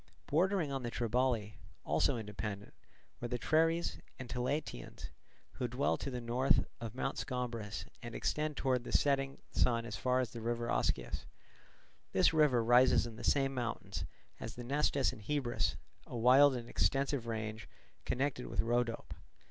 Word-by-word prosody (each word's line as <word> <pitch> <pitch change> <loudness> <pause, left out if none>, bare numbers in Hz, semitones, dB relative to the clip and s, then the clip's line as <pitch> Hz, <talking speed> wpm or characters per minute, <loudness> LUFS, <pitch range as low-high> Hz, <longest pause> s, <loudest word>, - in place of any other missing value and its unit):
Bordering 175 0 +2
on 135 -1 -2
the 120 - -3
Triballi, 115 -2 0 0.3
also 80 - +2
independent, 105 -1 -5 0.5
were 120 - -3
the 125 +1 -2
Treres 165 +5 +2 0.2
and 130 - -7
Tilataeans, 125 - -3 0.4
who 125 - -3
dwell 125 +4 +1
to - - -4
the 125 -2 -4
north 120 +3 +2
of 115 -1 -6
Mount 135 +1 -2
Scombrus 115 -5 -3 0.2
and 120 -2 -7
extend 150 -1 -1
towards 130 -3 +1
the - - -7
setting 135 -1 +2
sun 115 -2 +2
as 115 - -4
far 125 0 +2
as 125 -4 -1
the 115 - -7
river 120 +1 -1
Oskius. - - -1 0.9
This - - +4
river 145 -7 +4
rises 120 +1 +5
in 115 -2 -7
the - - -9
same 135 -1 +2
mountains 120 -3 -3 0.3
as 115 - -6
the 120 - -7
Nestus 140 +1 +1
and 110 - -11
Hebrus, 125 +1 0 0.3
a 120 - -5
wild 130 +4 +7
and 120 -1 -5
extensive 135 -2 +1
range 110 -2 -4 0.3
connected 130 0 -1
with - - -6
Rhodope. 120 0 -1
125 Hz, 155 wpm, -34 LUFS, 115-135 Hz, 0.9 s, wild